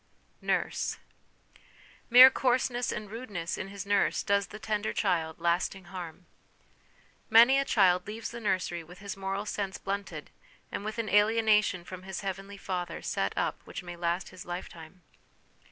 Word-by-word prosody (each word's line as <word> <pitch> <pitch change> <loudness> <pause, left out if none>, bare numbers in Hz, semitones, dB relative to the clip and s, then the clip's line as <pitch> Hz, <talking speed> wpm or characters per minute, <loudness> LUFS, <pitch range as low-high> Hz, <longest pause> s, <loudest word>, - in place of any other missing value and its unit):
'Nurse.' - - -1 1.1
Mere 255 +2 +10
coarseness 250 -2 +1
and 215 0 -5
rudeness 205 -8 -4
in - - -5
his 200 0 -7
nurse 200 0 +2
does 200 -1 +1
the - - -9
tender 215 0 -2
child 160 -2 0
lasting 175 +3 0
harm. 180 -1 -7 1.0
Many 240 +4 +7
a 275 - 0
child 185 -6 +3
leaves 220 +2 -5
the 235 - -7
nursery 185 -4 -1
with 175 +3 -14
his 200 0 -6
moral 195 +1 -3
sense 200 -2 -3
blunted, 200 +1 -5 0.4
and - - -4
with 215 +2 -5
an 230 -1 -2
alienation 210 -3 +3
from 185 +1 -9
his 190 0 -6
heavenly 195 +1 -5
Father 180 -3 -4
set 95 - -2
up - - -1
which - - -7
may 175 0 -7
last 170 +1 -2
his 185 - -10
lifetime. 175 -1 -8
195 Hz, 155 wpm, -29 LUFS, 180-215 Hz, 1.1 s, Mere